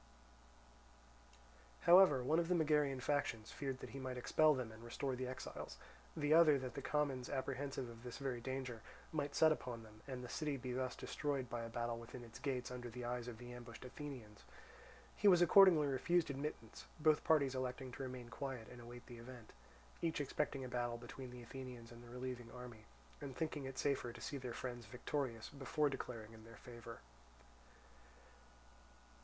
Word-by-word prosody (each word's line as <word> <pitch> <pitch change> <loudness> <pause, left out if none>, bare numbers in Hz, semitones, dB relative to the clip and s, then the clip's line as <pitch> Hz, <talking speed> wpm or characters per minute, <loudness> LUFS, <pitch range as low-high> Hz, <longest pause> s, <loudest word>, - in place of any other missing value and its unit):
However, 170 -7 +8
one 155 +6 +3
of 170 - +1
the 180 - +3
Megarian 150 -5 +3
factions 140 -7 0
feared 135 -2 -3
that - - -7
he 135 - -6
might 130 -1 -3
expel 155 +4 +5
them 125 -4 -3
and 110 +1 -11
restore 130 +3 -2
the 130 0 -2
exiles; 130 - -6 0.4
the 150 0 +3
other 160 -3 +8
that 130 -2 -4
the - - -4
commons, 140 -4 0
apprehensive 135 -1 -2
of 115 -1 -10
this 120 -1 -6
very 130 -3 -2
danger, 130 -2 -3 0.3
might 145 -2 -1
set 160 -1 +7
upon 120 -6 -2
them, 110 0 -14
and 130 -2 -4
the - - -5
city 150 +1 -1
be 130 -1 -4
thus 130 0 -1
destroyed 140 -5 -2
by 120 - -1
a 115 - -4
battle 120 0 -2
within 120 +1 -8
its 115 -1 -10
gates 125 -3 -1
under 125 -1 -5
the 120 +1 -5
eyes 120 0 -2
of 120 -2 -5
the 120 +1 -8
ambushed 120 0 -9
Athenians. 125 -6 -8 0.7
He 210 - +3
was 180 -3 +9
accordingly 175 -3 +8
refused 145 +4 +2
admittance, 135 -5 -5
both 155 -1 +5
parties 140 -4 +4
electing 130 0 -3
to - - -7
remain 125 -2 -5
quiet 125 -1 -4
and 125 -1 -10
await 120 +1 -10
the 120 -2 -9
event; 120 -2 -10 0.5
each 165 -2 +1
expecting 140 -1 -1
a - - -3
battle 120 -1 -1
between 125 +2 -8
the 125 0 -9
Athenians 125 -1 -8
and 120 0 -11
the 120 - -12
relieving 125 -1 -5
army, 120 -3 -9 0.4
and 140 -3 -6
thinking 155 -3 -1
it 135 0 -6
safer 135 -4 +1
to 120 - -10
see 145 - -3
their 125 -3 -4
friends 120 -3 -5
victorious 125 0 -2
before 145 +1 +1
declaring 115 -4 -5
in 110 -1 -12
their 115 +1 -12
favour. 120 -2 -9
130 Hz, 185 wpm, -40 LUFS, 120-145 Hz, 0.7 s, was